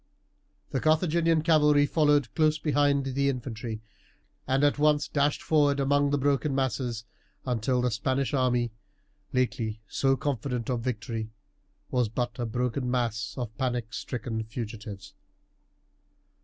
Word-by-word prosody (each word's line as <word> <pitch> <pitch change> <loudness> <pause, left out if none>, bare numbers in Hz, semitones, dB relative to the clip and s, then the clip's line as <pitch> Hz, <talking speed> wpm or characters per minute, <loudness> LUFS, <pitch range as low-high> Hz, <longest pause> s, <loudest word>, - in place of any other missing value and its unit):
The 135 - 0
Carthaginian 160 +1 +2
cavalry 150 -3 +5
followed 145 -6 +2
close 155 -1 +3
behind 145 -2 +2
the 140 +1 +1
infantry, 115 -4 -5 0.6
and 135 +2 +2
at 145 0 +3
once 150 0 +3
dashed 145 0 0
forward 145 -3 +3
among 145 +1 +2
the 145 - +1
broken 140 +1 +1
masses, 125 -3 -1 0.4
until 125 0 0
the 125 - +1
Spanish 130 +6 -1
army, 125 -3 +1 0.6
lately 120 -4 -1
so 135 +4 +1
confident 130 -4 -2
of 120 -2 -1
victory, 115 -2 -3 0.6
was 125 -3 +1
but 120 +3 -3
a 120 - -1
broken 125 +2 -1
mass 120 -3 -1
of 120 -4 -4
panic 120 -4 -2
stricken 115 -2 -4
fugitives. 110 -3 -7
130 Hz, 130 wpm, -28 LUFS, 120-145 Hz, 0.6 s, cavalry